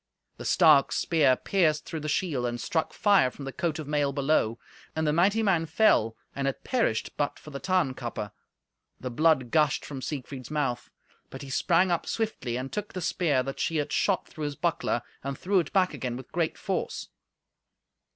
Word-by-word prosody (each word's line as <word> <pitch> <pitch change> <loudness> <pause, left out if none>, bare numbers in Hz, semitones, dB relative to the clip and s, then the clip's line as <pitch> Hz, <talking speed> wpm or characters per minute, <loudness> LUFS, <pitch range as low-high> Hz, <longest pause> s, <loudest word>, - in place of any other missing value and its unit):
The - - -8
stark 155 -6 +5
spear 145 -6 +3
pierced 155 -2 +1
through 160 - -5
the 155 0 -4
shield, 150 -7 0
and 120 0 -3
struck 160 +5 -1
fire 200 -11 +4
from 140 +2 -9
the 135 - -4
coat 165 +2 -2
of 155 -3 -6
mail 145 -1 +1
below. 140 -5 +1 0.4
And 160 0 0
the 150 - +2
mighty 200 +7 +3
man 175 -6 +2
fell, 155 - +3 0.2
and 140 0 -1
had 135 - -3
perished 230 - 0
but 145 - -1
for 150 - -12
the 140 - -5
Tarnkappe. 135 - -1 0.7
The 125 - -5
blood 145 -2 +2
gushed 150 -3 +2
from 135 -3 -6
Siegfried's 135 -3 -6
mouth. 145 -5 -2 0.4
But 135 - -8
he 135 - -8
sprang 175 +6 +3
up 170 - -1
swiftly, 140 - -2
and 130 +1 -5
took 210 0 -4
the 185 - -4
spear 150 -6 +1
that 135 +1 -6
she 165 - 0
had 150 -1 -1
shot 195 -3 +1
through 155 -2 -6
his 145 -1 -3
buckler, 170 -8 -1 0.2
and 140 0 -4
threw 195 +1 +2
it 165 - -3
back 185 -4 +2
again 125 -4 -4
with 130 - -10
a - - -36
great 165 -2 -1
force. - - -3
150 Hz, 195 wpm, -27 LUFS, 135-170 Hz, 0.7 s, stark